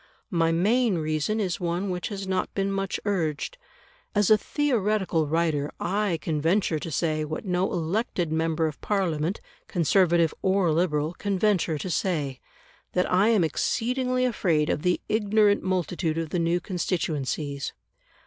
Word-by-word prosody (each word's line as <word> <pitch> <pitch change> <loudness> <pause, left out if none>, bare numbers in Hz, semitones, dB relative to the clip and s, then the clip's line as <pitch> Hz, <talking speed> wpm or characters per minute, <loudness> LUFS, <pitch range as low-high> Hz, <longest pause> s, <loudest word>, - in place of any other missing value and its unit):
My 165 -2 +2
main 210 +4 +2
reason 155 +6 -1
is 185 -5 -1
one 180 +2 -1
which 180 -1 -3
has 200 -2 -5
not 185 -1 -1
been 195 0 0
much 195 -1 -2
urged. 190 - -1 0.6
As 205 0 +3
a - - +10
theoretical 210 - 0
writer 155 -2 0
I 200 -3 0
can 150 -1 -2
venture 165 -1 +1
to 165 - -5
say, 155 0 0
what 155 +6 -5
no 180 0 0
elected 175 0 -1
member 160 0 +1
of 155 -2 -4
Parliament, 180 -4 -1 0.3
Conservative 170 -2 +3
or 190 -3 +2
Liberal, 155 -1 +1
can 200 +1 -2
venture 185 -6 +2
to 185 - -5
say, 150 -9 -1 0.5
that 180 0 +1
I 190 +4 +4
am 220 -6 +4
exceedingly 255 - 0
afraid 170 -10 +1
of - - -1
the 180 +1 +1
ignorant 210 -1 +3
multitude 180 -3 -1
of 165 -2 -3
the 180 - 0
new 170 +1 +1
constituencies. 155 -6 -2
180 Hz, 150 wpm, -26 LUFS, 160-200 Hz, 0.6 s, a